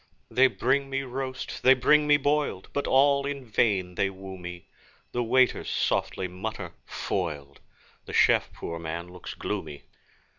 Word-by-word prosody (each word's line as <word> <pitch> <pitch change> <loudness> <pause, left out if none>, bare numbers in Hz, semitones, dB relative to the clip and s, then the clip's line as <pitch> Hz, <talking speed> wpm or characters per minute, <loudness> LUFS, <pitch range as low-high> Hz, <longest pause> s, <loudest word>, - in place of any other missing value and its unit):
They 130 +1 +6
bring 135 +2 0
me 135 0 -1
roast, 130 0 -5
they 130 +1 +7
bring 150 +4 +4
me 145 0 +6
boiled, 145 -8 0
But 140 - -1
all 140 +1 +4
in 140 -2 -5
vain 100 -5 +1
they 100 +2 +1
woo 95 0 -9
me; 90 -1 -8 0.5
The 120 - -1
waiters 130 +2 +2
softly 95 - 0
mutter, 95 +5 -6
'Foiled!' 75 -7 -4 0.5
The - - -8
chef, - - +4
poor 85 0 -6
man, 85 +1 -5
looks 90 0 -9
gloomy. 70 - -5
120 Hz, 150 wpm, -27 LUFS, 90-135 Hz, 0.5 s, they